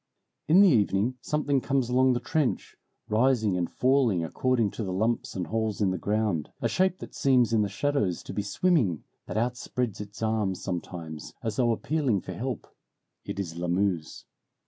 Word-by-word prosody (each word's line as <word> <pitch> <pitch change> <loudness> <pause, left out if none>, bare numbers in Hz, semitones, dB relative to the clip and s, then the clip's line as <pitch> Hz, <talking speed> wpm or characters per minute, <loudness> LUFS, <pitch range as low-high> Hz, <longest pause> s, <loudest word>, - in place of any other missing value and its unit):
In 170 +6 +7
the 200 - +8
evening 110 - +2
something 145 -3 0
comes 135 -2 0
along 130 +1 +4
the 120 - 0
trench, 135 +3 -1 0.3
rising 110 -3 +2
and 90 -1 -1
falling 125 -9 +2
according 115 +4 +1
to 115 - -5
the 95 - -3
lumps 110 +5 -1
and 90 -2 -2
holes 110 +2 -2
in 100 -3 +2
the 95 - -2
ground; 105 -6 0
a - - +1
shape 185 0 +1
that - - -10
seems 125 -4 +3
in 110 - +4
the 105 - 0
shadows 105 -5 -1
to - - -7
be 105 - -1
swimming, 105 - +1 0.2
that - - -4
outspreads 120 -2 -2
its 105 +2 -8
arms 110 -4 0
sometimes, 85 -4 -6
as 110 -2 -3
though 120 -2 +3
appealing 130 - 0
for - - -7
help. 125 -2 -4 0.6
It - - -5
is 85 -4 -4
Lamuse. 90 -1 -1
110 Hz, 175 wpm, -27 LUFS, 95-130 Hz, 0.6 s, the